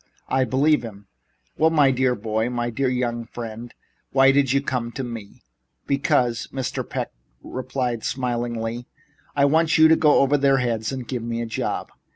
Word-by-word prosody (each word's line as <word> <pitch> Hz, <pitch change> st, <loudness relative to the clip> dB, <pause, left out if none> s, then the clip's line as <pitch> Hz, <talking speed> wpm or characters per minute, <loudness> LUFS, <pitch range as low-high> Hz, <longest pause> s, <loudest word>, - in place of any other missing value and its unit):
I 130 Hz, 0 st, +2 dB
believe 140 Hz, +5 st, +2 dB
him." 105 Hz, -4 st, -10 dB, 0.5 s
"Well, 160 Hz, -, +5 dB
my 145 Hz, -4 st, +4 dB
dear 130 Hz, -1 st, +1 dB
boy 110 Hz, +1 st, -1 dB
my 120 Hz, -1 st, -2 dB
dear 135 Hz, +3 st, 0 dB
young 120 Hz, -2 st, -1 dB
friend! 115 Hz, 0 st, -7 dB, 0.4 s
Why 135 Hz, 0 st, +6 dB
do 140 Hz, -, +3 dB
you 135 Hz, 0 st, +2 dB
come 125 Hz, -4 st, -3 dB
to 135 Hz, -, -4 dB
me?" 115 Hz, -5 st, -8 dB, 0.4 s
"Because," 135 Hz, -4 st, +1 dB
Mr. 130 Hz, -2 st, -3 dB
Peck -, -, -3 dB, 0.3 s
replied 125 Hz, -2 st, -3 dB
smilingly, 120 Hz, -2 st, -3 dB, 0.5 s
"I 140 Hz, -1 st, +4 dB
want 160 Hz, +3 st, +3 dB
you 160 Hz, 0 st, +8 dB
to 160 Hz, -, +7 dB
go 150 Hz, -2 st, +4 dB
over 140 Hz, +1 st, +3 dB
their 135 Hz, -1 st, +4 dB
heads 115 Hz, -3 st, -1 dB
and 130 Hz, -3 st, -5 dB
give 125 Hz, -3 st, -3 dB
me 115 Hz, 0 st, -3 dB
a 120 Hz, -, -2 dB
job. 115 Hz, -, -3 dB
125 Hz, 175 wpm, -23 LUFS, 115-135 Hz, 0.5 s, you